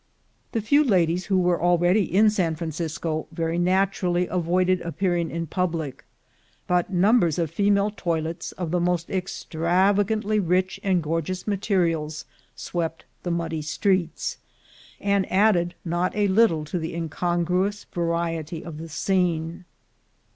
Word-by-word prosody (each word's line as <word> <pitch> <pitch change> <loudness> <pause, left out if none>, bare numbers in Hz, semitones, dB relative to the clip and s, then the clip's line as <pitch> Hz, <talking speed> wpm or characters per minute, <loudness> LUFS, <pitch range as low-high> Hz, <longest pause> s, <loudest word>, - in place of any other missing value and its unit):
The 225 - 0
few 285 +8 +4
ladies 180 - +2
who 195 -2 +2
were 180 -1 +2
already 175 +2 +3
in 210 +4 +5
San 175 -6 0
Francisco, 160 0 -3
very 165 +1 -1
naturally 180 -1 +1
avoided 180 +1 +1
appearing 170 -1 -1
in 170 0 -3
public; 165 -5 -3 0.6
but 180 0 +1
num 200 +7 +4
bers 170 -6 +1
of 165 -3 -1
female 200 +2 +2
toilettes, 165 -3 -3
of 175 -3 -4
the 180 - +1
most 175 -1 0
extravagantly 195 +4 +1
rich 185 0 0
and 185 -4 +1
gorgeous 165 +4 -2
materials, 170 -7 0 0.3
swept 165 -2 -4 0.2
the 175 - -4
muddy 170 -2 -2
streets, 175 +1 -1 0.6
and 200 -1 0
added 185 -3 +3
not 175 +2 -1
a 205 -1 +2
little 190 -6 +3
to 175 +4 -3
the 160 0 -4
incongruous 175 +4 -1
variety 170 -1 -2
of 155 -3 -7
the 165 +1 -7
scene. 170 0 -1
175 Hz, 135 wpm, -24 LUFS, 165-190 Hz, 0.6 s, in